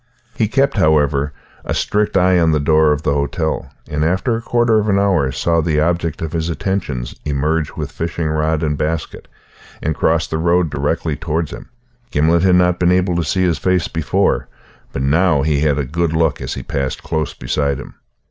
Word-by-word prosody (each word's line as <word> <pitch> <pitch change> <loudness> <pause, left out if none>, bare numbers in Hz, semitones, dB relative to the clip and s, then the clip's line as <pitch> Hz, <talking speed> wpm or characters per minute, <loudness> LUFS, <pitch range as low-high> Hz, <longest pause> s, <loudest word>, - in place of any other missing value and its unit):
He 110 - 0
kept, 135 +3 +1
however, 75 -4 +2 0.3
a - - -3
strict 105 -1 0
eye 90 -1 +4
on 80 -2 +3
the 75 - +2
door 75 +1 +3
of 75 +1 -1
the 75 - +1
hotel, 75 +3 -2 0.2
and 75 +1 -2
after 95 +9 +1
a 115 - -3
quarter 120 -2 +2
of 105 0 -1
an 100 - +3
hour 95 -9 +2
saw 85 +4 +1
the 80 -1 0
object 85 0 -1
of 80 - -3
his 80 0 -1
attentions 80 -9 -3
emerge 75 +2 -1
with - - -5
fishing 85 0 -3
rod 80 +1 0
and 75 -1 0
basket, 80 +1 -3 0.5
and 80 - -1
cross 80 +1 +1
the 80 - -3
road 85 -1 +2
directly 75 +2 -1
towards 80 0 -2
him. - - -9 0.4
Gimblet 80 -2 +2
had 90 -1 +4
not 90 0 +3
been 90 0 +3
able 90 -1 +2
to 85 - 0
see 95 +3 0
his 90 -2 +1
face 90 -2 +1
before, 80 -2 0 0.4
but 65 - -3
now 80 +1 +3
he 75 -1 +1
had 75 -1 +1
a 75 - -1
good 80 +4 -1
look 80 -2 +1
as - - -4
he - - -6
passed 70 -2 -3
close 80 -2 -2
beside 70 -2 -1
him. - - -10
80 Hz, 200 wpm, -18 LUFS, 75-90 Hz, 0.5 s, eye